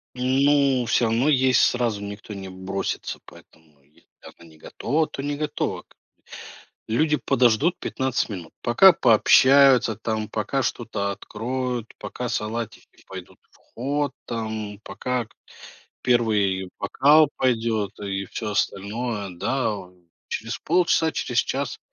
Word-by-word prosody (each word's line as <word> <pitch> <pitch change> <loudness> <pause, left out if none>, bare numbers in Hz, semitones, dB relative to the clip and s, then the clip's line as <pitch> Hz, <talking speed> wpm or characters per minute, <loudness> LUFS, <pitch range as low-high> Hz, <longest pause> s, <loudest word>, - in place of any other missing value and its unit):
Ну 135 0 +2
всё 120 - +2
равно 115 +6 +2
есть 130 -3 +4
сразу 120 -4 +1
никто 100 +1 -8
не 95 -1 -7
бросится, 95 +1 -4
поэтому, 75 -3 -19
если 75 +2 -29 0.2
явно - - -14
не 80 -2 -17
готова, 155 - -2
то - - -7
не 145 +1 -2
готова 150 0 -3
как - - -54
бы. - - -25 1.0
Люди 150 +4 +2
подождут 125 +6 +2
15 130 -3 -2
минут, 90 -5 -7
пока 180 +11 +7
пообщаются, 130 0 +5
там, 110 0 -3
пока 110 +5 -2
что-то 110 -5 -2
откроют, 120 +3 -4
пока 125 0 -5
салатики 115 0 -5
пойдут - - -10
в - - -25 0.2
ход, 140 +2 -1
там, 110 -3 -5
пока 125 -1 -3
к - - -28 0.7
1 105 -6 +1
бокал 145 +9 +4
пойдет 110 -5 0
и 100 -1 -3
всё 105 +2 -5
остальное, 105 +1 -2
да, 125 +8 -1
вот 90 -2 -10 0.3
через 115 +3 -4
полчаса 165 -1 +2
через - - -2
час - - -3
115 Hz, 130 wpm, -23 LUFS, 100-130 Hz, 1.0 s, пока